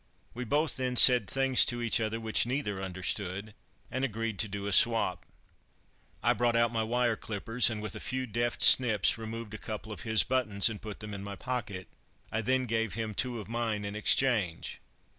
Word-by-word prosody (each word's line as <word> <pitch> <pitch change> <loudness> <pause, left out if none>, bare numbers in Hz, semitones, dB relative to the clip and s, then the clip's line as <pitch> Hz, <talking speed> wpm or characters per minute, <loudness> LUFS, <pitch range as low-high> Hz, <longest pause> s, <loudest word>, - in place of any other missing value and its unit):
We 125 +1 -7
both 150 +6 0
then 130 -1 -3
said 125 -4 +8
things 135 -1 +3
to 120 - -2
each 115 -1 +1
other 110 +1 -3
which 110 +1 +1
neither 120 -7 -3
understood, 95 +2 -4 0.4
and 130 +1 -4
agreed 115 -4 -4
to 110 - -1
do 100 0 -7
a 100 - -2
swap. 95 -7 +3 1.0
I - - +3
brought 120 -1 -1
out 115 0 +1
my 115 - -1
wire 120 +1 -1
clippers 115 +4 0
and, 110 -2 -6
with 105 -3 -6
a - - -8
few 130 0 -4
deft 120 +1 -3
snips, 115 -4 +4
removed 110 -1 -8
a 110 - -8
couple 110 0 -8
of 100 -6 -8
his 110 -1 +3
buttons 120 -6 +1
and 105 -2 -9
put 105 -2 -9
them 105 -1 -8
in 100 -1 -8
my 100 0 -8
pocket. 105 -5 -6 0.4
I 110 - -2
then 130 +3 -1
gave 115 -3 -3
him 110 -1 -5
two 120 +2 -2
of 105 - -10
mine 115 -3 -4
in 100 0 -7
exchange. 105 -5 +1
110 Hz, 200 wpm, -28 LUFS, 105-120 Hz, 1.0 s, said